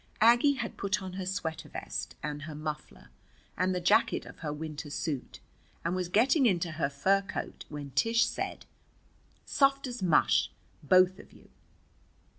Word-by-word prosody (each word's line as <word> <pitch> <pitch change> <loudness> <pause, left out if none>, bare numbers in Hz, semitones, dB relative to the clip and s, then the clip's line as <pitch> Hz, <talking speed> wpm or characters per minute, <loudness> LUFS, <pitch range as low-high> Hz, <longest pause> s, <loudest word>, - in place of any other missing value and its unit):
Aggie 240 +5 +6
had 240 -4 -5
put 200 +1 0
on 190 -2 -7
her 185 -1 -5
sweater 175 -4 -3
vest - - -5
and 150 0 -4
her 150 +1 -7
muffler 150 - -7 0.4
and 185 0 +1
the - - 0
jacket 175 - +3
of - - -12
her 150 - -3
winter 150 0 -6
suit 145 -3 -4 0.5
and 170 +2 0
was 180 -1 -2
getting 255 - +4
into 175 -4 +1
her 155 -3 -1
fur 190 +9 +2
coat, 195 -1 -6
when 145 -2 -7
Tish 230 - +3
said: - - -4 0.8
"Soft 275 0 +2
as 245 -4 -5
mush, 65 - +3 0.3
both 185 +4 +4
of - - -14
you!" - - -19
180 Hz, 160 wpm, -30 LUFS, 150-210 Hz, 0.8 s, Aggie